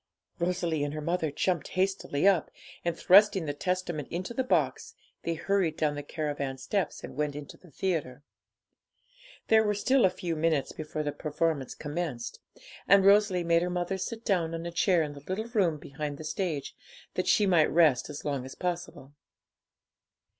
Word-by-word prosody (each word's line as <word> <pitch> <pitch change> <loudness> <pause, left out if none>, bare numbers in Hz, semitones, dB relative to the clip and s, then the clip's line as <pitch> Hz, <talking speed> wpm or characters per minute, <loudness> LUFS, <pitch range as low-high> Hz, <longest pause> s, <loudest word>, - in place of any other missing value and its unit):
Rosalie 170 -3 0
and 145 +1 -3
her - - -3
mother 165 +1 -1
jumped 160 +2 -1
hastily 190 -4 +1
up, 190 -5 +3 0.3
and, 170 -1 -1
thrusting 200 -1 +6
the 145 - -2
Testament 175 -2 -2
into 185 +6 -4
the 260 - 0
box, 255 - 0 0.3
they 165 - -2
hurried 180 -2 0
down 150 -2 +1
the 145 - -4
caravan 145 -3 -3
steps 185 +6 -2
and - - -8
went 150 0 -1
into 145 -1 -8
the 180 - -18
theatre. 145 -5 -2 1.3
There 220 0 +6
were 210 -1 +1
still 255 +5 +3
a 190 - +6
few 175 -2 -4
minutes 155 -3 +1
before 155 0 -4
the 145 - -1
performance 150 -1 -2
commenced; 145 -6 -4 0.5
and 195 -1 +6
Rosalie 200 -3 +5
made 170 0 +3
her 180 - -1
mother 180 +2 -2
sit 230 +4 -5
down 165 -4 +1
on 165 +1 -5
a 170 - -4
chair 175 0 +3
in 150 -1 -5
the 145 - -10
little 185 +9 -4
room 190 -9 +2
behind 145 0 -6
the 155 - -8
stage, 155 -3 -3 0.4
that 185 - -2
she 210 - +4
might 170 -5 +4
rest 155 -6 +4
as 145 - -7
long 140 -3 -1
as 130 - -9
possible. 175 -6 -4
170 Hz, 175 wpm, -29 LUFS, 150-185 Hz, 1.3 s, thrusting